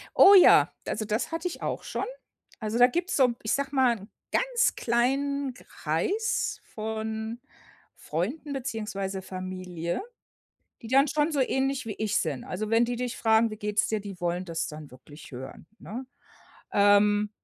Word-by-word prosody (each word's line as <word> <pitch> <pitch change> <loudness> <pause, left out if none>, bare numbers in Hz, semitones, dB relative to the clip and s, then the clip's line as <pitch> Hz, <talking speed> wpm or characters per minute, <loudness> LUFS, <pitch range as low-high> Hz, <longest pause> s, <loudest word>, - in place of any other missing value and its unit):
Oh, 395 - +9
ja. 370 - +7 0.2
Also, 215 - -2
das 215 +8 -1
hatte 330 +2 -2
ich 350 - -7
auch - - -3
schon. - - -3 0.5
Also, 220 +1 -2
da 245 +1 +8
gibt's 345 +7 -2
so 255 -3 +4
ich 220 - -2
sage 280 0 -2
mal, 255 -3 +4
'nen 205 0 -12 0.2
ganz - - +2
kleinen 270 +3 0
Kreis 425 - -2
von 220 +1 -4 0.6
Freunden 255 - -3
beziehungsweise 210 -7 -4
Familie, 185 -2 -5 0.8
die 225 - -8
dann 275 +4 +4
schon 295 +2 +1
so 285 - +1
ähnlich 265 0 0
wie 220 - -3
ich 215 -2 -1
sind. 145 -6 -1
Also, 210 +4 -4
wenn 225 +1 +4
die 240 0 -2
dich 245 0 -3
fragen: 225 0 +3
„Wie 215 - -6
geht's 210 0 0
dir?“ 215 -1 -1
Die 195 -3 -9
wollen 175 +1 -1
das 165 -2 -3
dann 150 -1 -9
wirklich 145 +4 -14
hören, 130 +4 -9
ne? 245 +6 -7 0.7
Ähm, 205 +1 +4
220 Hz, 160 wpm, -27 LUFS, 195-265 Hz, 0.8 s, Oh